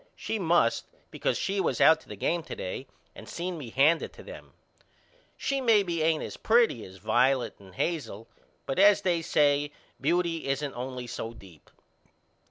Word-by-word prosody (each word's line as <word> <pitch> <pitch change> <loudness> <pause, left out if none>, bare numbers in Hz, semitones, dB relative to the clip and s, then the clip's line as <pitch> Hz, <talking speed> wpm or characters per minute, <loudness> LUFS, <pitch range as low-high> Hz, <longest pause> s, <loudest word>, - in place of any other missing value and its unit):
She 220 - -3
must 170 -9 +2 0.2
because - - -1
she 195 0 -1
was - - -1
out 160 0 +6
to - - -21
the - - -6
game 170 0 0
to - - -6
day 95 +8 -5 0.3
and 110 - -12
seen 175 +1 -4
me 145 -8 -7
hand 150 +7 +4
it - - -6
to - - -13
them. - - -11 0.8
She 275 -1 -1
maybe 200 -9 +2
ain't 160 0 +2
as - - -7
pretty 225 - +3
as 95 0 -13
Violet 125 +5 +2
and 95 -2 -16
Hazel 115 -10 -3 0.4
but 135 - -2
as 205 +1 +6
they 175 -3 +1
say 145 -2 +2 0.3
beauty 165 +2 0
isn't 140 +1 -2
only 125 0 -5
so 115 -1 -6
deep. 90 -8 -16
150 Hz, 175 wpm, -28 LUFS, 125-175 Hz, 0.8 s, out